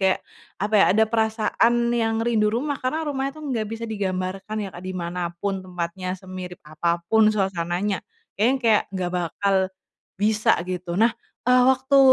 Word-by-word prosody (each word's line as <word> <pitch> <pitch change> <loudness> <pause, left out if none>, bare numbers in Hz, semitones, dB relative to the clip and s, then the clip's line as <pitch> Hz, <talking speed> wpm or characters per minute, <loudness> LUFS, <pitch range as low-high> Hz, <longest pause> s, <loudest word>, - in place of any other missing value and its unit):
kayak, 190 -1 +3 0.4
apa 210 +2 -2
ya, - - +8
ada 220 - +6
perasaan 230 +2 +2
yang 225 -1 +1
rindu 220 -3 +2
rumah 270 +6 -1
karena 310 +5 -1
rumahnya 275 -2 -2
tuh - - -10
gak 220 -3 -1
bisa 225 +1 -5
digambarkan 195 -1 -3
ya, - - -5
Kak, 175 - -10
di 185 0 -5
mana 175 0 -3
pun 195 +1 -2
tempatnya, 180 +1 -4
semirip 185 -1 -8
apa 170 +3 -1
pun 220 -1 +6
suasananya. 190 -1 0 0.4
Kayaknya 210 +3 +3
yang 270 - +2
kayak 220 -2 +4
gak 180 -1 -1
bakal 180 +3 0 0.6
bisa 215 +2 +3
gitu, 180 -1 -4
nah, 225 +2 +4 0.3
eee, 250 +1 +5
waktu, 265 +1 +3
205 Hz, 170 wpm, -24 LUFS, 185-230 Hz, 0.6 s, ya